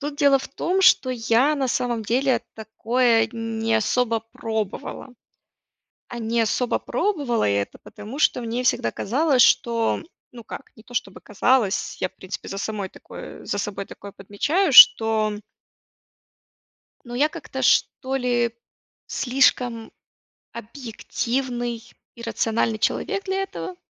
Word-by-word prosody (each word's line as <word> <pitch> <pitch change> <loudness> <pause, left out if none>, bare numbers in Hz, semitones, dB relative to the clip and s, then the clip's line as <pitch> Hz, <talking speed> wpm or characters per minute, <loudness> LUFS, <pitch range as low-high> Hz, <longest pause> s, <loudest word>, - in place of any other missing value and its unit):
Тут 290 0 -5
дело 280 -2 +4
в - - -8
том, 370 +7 -1
что 260 -7 +5
я, 245 +4 +2
на 270 -3 -1
самом 240 -2 -1
деле, 255 +4 +1
такое 225 +1 +1
не 225 -1 -2
особо 230 +1 0
пробовала. 220 +2 -4 1.0
А 240 - -7
не 230 +1 -1
особо 230 +2 0
пробовала 285 - -1
я 100 0 +1
это, - - -10
потому 215 +7 -10
что 280 - +2
мне 235 +1 -3
всегда 245 - +1
казалось, 265 +3 +2
что 230 -1 +2 0.3
ну 235 -2 -11
как, 270 - -9
не 220 - -15
то, 245 - -17
чтобы - - -3
казалось, 210 0 +1
я, 185 - 0
в 185 - -35
принципе, 185 +1 -8
за 195 - -5
самой 205 -2 -4
такое - - -11
за 205 - -3
собой 200 -1 -4
такое 200 -1 -11
подмечаю, 285 - -1
что 220 -3 +7 1.7
ну, 240 - -8
я 285 +5 +2
как-то, - - -7
что 265 0 +2
ли, 240 -2 0 0.5
слишком 245 -3 +1 0.6
объективный 240 0 -4 0.3
и 235 - -10
рациональный 225 -1 -1
человек 395 - -1
для 385 0 -1
этого. 380 -1 -6
235 Hz, 135 wpm, -23 LUFS, 220-265 Hz, 1.7 s, что